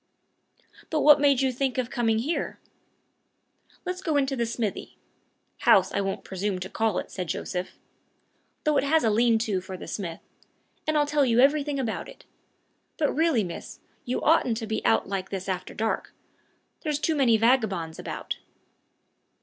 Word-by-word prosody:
"But 310 -2 0
what 295 -1 +7
made 280 -2 +4
you 265 -1 +2
think 265 +1 -1
of 255 -1 -1
coming 225 -2 +1
here?" 285 +9 -2 1.3
"Let's 365 +1 -3
go 315 -5 0
into 270 -1 +1
the 235 -2 -1
smithy 225 -3 -4 0.6
house 190 0 +5
I - - 0
won't 195 0 -3
presume 195 +1 -2
to 185 +1 -6
call 220 -4 0
it," - - -4
said 180 -2 -4
Joseph, 180 +2 -3 0.9
"though 305 -2 +2
it - - +3
has 315 +3 +3
a 225 - +3
lean 230 +1 +4
to 215 -4 -1
for 185 0 -7
the - - -8
smith 170 -5 -5 0.7
and 310 0 +2
I'll 295 - +4
tell 290 0 +2
you 240 -2 +3
everything 285 +1 +3
about 235 -4 -3
it. - - -15 0.7
But 300 -3 +1
really, 315 -8 +2
miss, 175 -2 -7 0.2
you 255 -2 -2
oughtn't 275 -7 +3
to 225 - -4
be 220 0 -3
out 110 0 +3
like 190 -1 -3
this 190 -1 -5
after 185 -2 -4
dark. 220 +1 -2 0.7
There's 300 -3 -1
too 320 +2 0
many 245 -6 +4
vagabonds 215 -9 +1
about." - - -5
235 Hz, 170 wpm, -26 LUFS, 195-285 Hz, 1.3 s, what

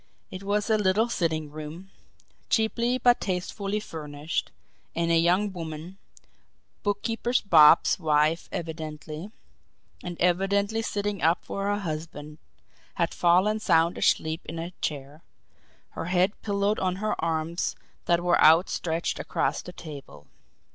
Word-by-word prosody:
It 185 - -7
was 205 +1 0
a 220 -2 +2
little 210 +4 +2
sitting 160 -8 -1
room, 155 +5 -9 0.6
cheaply 235 +2 +1
but 245 -1 +3
tastefully 195 +2 -2
furnished, 150 -5 -4 0.5
and 170 0 0
a - - +4
young 180 +5 +2
woman, 165 +2 -7 0.8
Bookkeeper 225 +3 -2 0.2
Bob's 160 -1 +6
wife 155 0 +1
evidently, 155 +1 -6 0.7
and 175 -1 -6
evidently 200 +5 +1
sitting 205 -3 -2
up 165 +2 +2
for 195 - -4
her 205 0 +1
husband, 155 -3 -6 0.6
had - - 0
fallen 185 +5 +3
sound 170 -4 +3
asleep 160 +2 +1
in 165 - -6
a 165 +2 -5
chair, 145 +1 -4 0.7
her - - -6
head 180 +2 +2
pillowed 200 0 0
on 185 -1 0
her 215 +2 -1
arms 165 +1 -1 0.3
that 170 0 +2
were 175 -1 +3
outstretched 165 0 +3
across - - -1
the 180 - -9
table. 150 -5 -10
175 Hz, 125 wpm, -26 LUFS, 160-200 Hz, 0.8 s, Bob's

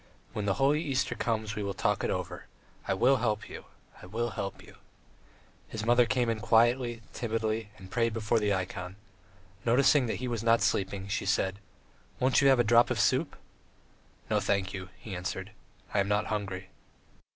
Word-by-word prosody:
When 105 - -3
the 100 -2 +1
holy 145 +3 +3
Easter 140 -5 0
comes, 110 -2 -2
we 105 - -3
will 100 -1 -3
talk - - 0
it - - 0
over.... - - -4 0.4
I - - +1
will 130 +7 +4
help 110 -3 -1
you.... - - -9 0.4
I - - -10
will 115 +4 -2
help 100 -3 -5
you... - - -16 0.5
." - - -31
His 110 -1 -5
mother 120 0 +5
came 125 -1 +1
in 115 -1 0
quietly, 120 +2 +2
timidly, 110 -2 -2
and 95 -1 -13
prayed 115 0 +1
before 110 +1 +1
the 105 -1 +1
ikon. 90 -1 -3 0.7
Noticing 130 +2 +4
that - - -1
he 130 - -4
was 120 -3 -2
not 115 0 +3
sleeping, 95 0 0
she 100 -1 -2
said: 95 0 +1 0.6
"Won't 130 +1 +3
you 140 - +5
have 135 -2 +5
a - - +5
drop 120 +1 +5
of 125 -3 -1
soup?" 130 +7 +2 0.9
"No, - - +2
thank 100 0 0
you," 95 -2 -6
he 100 -4 -7
answered, 95 +2 -4 0.4
"I 100 - +2
am 100 - +2
not 105 +1 +1
hungry." 95 -2 -4
110 Hz, 185 wpm, -29 LUFS, 100-120 Hz, 0.9 s, mother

